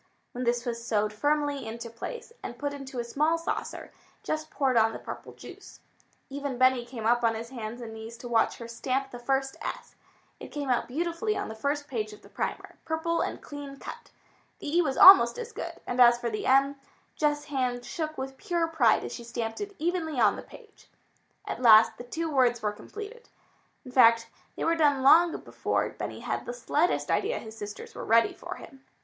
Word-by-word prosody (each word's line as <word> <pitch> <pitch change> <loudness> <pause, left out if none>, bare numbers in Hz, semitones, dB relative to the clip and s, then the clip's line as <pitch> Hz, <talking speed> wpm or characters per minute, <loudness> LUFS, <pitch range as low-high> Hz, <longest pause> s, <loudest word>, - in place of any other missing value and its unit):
When 250 +1 -4
this 240 +1 +1
was 235 -1 -3
sewed 210 -2 0
firmly 290 +1 0
into 235 +1 -6
place, 465 - -7
and 240 - -7
put 285 +1 -3
into 270 -2 -8
a 240 - -1
small 305 +7 +1
saucer, 330 - -4 0.3
Jess 310 0 -2
poured 270 -5 0
on 225 -1 +4
the - - -5
purple - - -8
juice. - - -12 0.5
Even 280 -2 -4
Benny 255 -1 +4
came 235 -3 -7
up 240 +1 +3
on 225 -1 +3
his 230 +2 -7
hands 235 -1 -6
and 225 -2 -7
knees 220 +1 -9
to 245 - -8
watch 230 -2 +2
her 235 - -8
stamp 265 +3 -2
the 245 - -8
first 270 +2 -1
s. - - -6 0.5
It - - -8
came 285 -3 -3
out 245 - +1
beautifully 340 - -1
on - - -3
the - - -5
first 285 +6 -2
page 215 -6 -3
of 210 - -15
the - - -15
primer, - - -4
purple 330 +1 -1
and - - -3
clean 285 -1 -8
cut. - - -9 0.5
The 295 - -4
e 350 - +6
was 270 -5 -1
almost 385 +4 +9
as 475 -1 -6
good, - - -5
and 245 +1 0
as 240 -1 +8
for 240 -1 -3
the 215 - -3
m, 275 +2 +4 0.4
Jess' 295 -1 0
hand 250 -4 -2
shook 310 +1 -4
with 265 0 -5
pure 340 +1 0
pride 290 -9 +3
as - - -5
she 240 - -7
stamped 230 - -4
it 405 -1 -5
evenly 320 -3 -1
on - - +4
the - - -7
page. - - -16 0.6
At - - -5
last 225 -2 +7
the - - -6
two 325 +7 -3
words 245 -4 +2
were 210 - +1
completed. 435 - -10 0.6
In 255 - -9
fact, 230 -2 +5 0.2
they - - -4
were 330 - +3
done 290 -4 +3
long 330 +5 +6
before - - -1
Benny - - -6
had - - -3
the 245 - -4
slightest 300 +8 0
idea 445 +5 +1
his 220 -1 -9
sisters 205 -1 -8
were - - -7
ready 230 +1 +4
for - - -7
him. 270 - -13
260 Hz, 205 wpm, -28 LUFS, 235-300 Hz, 0.6 s, almost